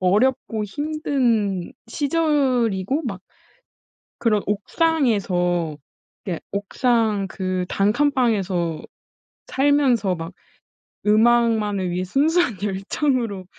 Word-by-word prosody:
어렵고 215 +3 +1
힘든 240 - -1
시절이고 275 - 0
막 195 -6 -4 1.0
그런 215 -4 +2
옥상에서 200 - 0 0.5
그러니까 175 -4 -4
옥상 210 0 0
그 185 -1 -2
단칸방에서 205 - +1 0.6
살면서 265 -8 +2
막 165 +1 -7 0.7
음악만을 215 -3 +3
위해 180 +1 -2
순수한 285 - +2
열정으로 205 +1 -1
215 Hz, 200 characters per minute, -22 LUFS, 190-265 Hz, 1.0 s, 음악만을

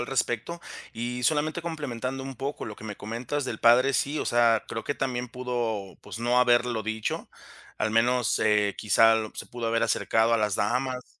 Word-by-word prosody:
al 120 - -3
respecto?, 135 +5 -2 0.3
y 120 +2 -4
solamente 155 +5 +1
complementando 135 -5 -4
un 135 0 -6
poco 140 +3 -4
lo 105 - -7
que 110 - -12
me 105 -2 -6
comentas 120 +7 -4
del 110 - -4
padre, 125 +4 +5
sí, 145 +3 0
o - - -1
sea, 115 -1 +3
creo 115 - -5
que 145 - -1
también 125 -3 -2
pudo, 120 -6 -3
pues - - -9
no 120 +1 +2
haberlo 120 -2 +3
dicho. 110 0 -3 0.5
Al 110 - 0
menos, 120 -1 +2
eh, 105 -2 +2
quizás 110 +2 +5 0.2
se - - -7
pudo 120 -1 -5
haber 115 0 +1
acercado 115 0 +2
a - - +5
las 105 -2 +1
damas, 125 +4 -2
120 Hz, 185 wpm, -27 LUFS, 110-130 Hz, 0.5 s, padre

